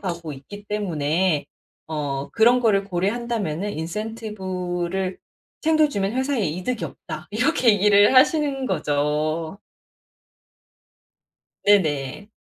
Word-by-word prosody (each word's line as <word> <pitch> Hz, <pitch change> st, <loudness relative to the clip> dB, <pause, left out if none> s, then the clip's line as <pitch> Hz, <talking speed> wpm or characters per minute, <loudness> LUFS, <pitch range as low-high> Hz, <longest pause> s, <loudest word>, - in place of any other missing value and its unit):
가고 170 Hz, -4 st, -4 dB
있기 205 Hz, +10 st, -11 dB
때문에 175 Hz, -5 st, 0 dB, 0.4 s
어 145 Hz, -3 st, -3 dB
그런 240 Hz, +3 st, +5 dB
거를 205 Hz, -4 st, +2 dB
고려한다면은 200 Hz, -1 st, -2 dB
"인센티브를 185 Hz, -1 st, -4 dB, 0.4 s
챙겨 315 Hz, -1 st, +4 dB
주면 200 Hz, -6 st, -1 dB
회사에 260 Hz, 0 st, 0 dB
이득이 185 Hz, +10 st, -3 dB
없다." 155 Hz, +1 st, -9 dB
이렇게 250 Hz, +4 st, +1 dB
얘기를 205 Hz, +3 st, +5 dB
하시는 280 Hz, 0 st, +3 dB
거죠. 155 Hz, -, -1 dB, 2.1 s
네네. 160 Hz, -3 st, +2 dB
195 Hz, 230 characters per minute, -23 LUFS, 160-225 Hz, 2.1 s, 그런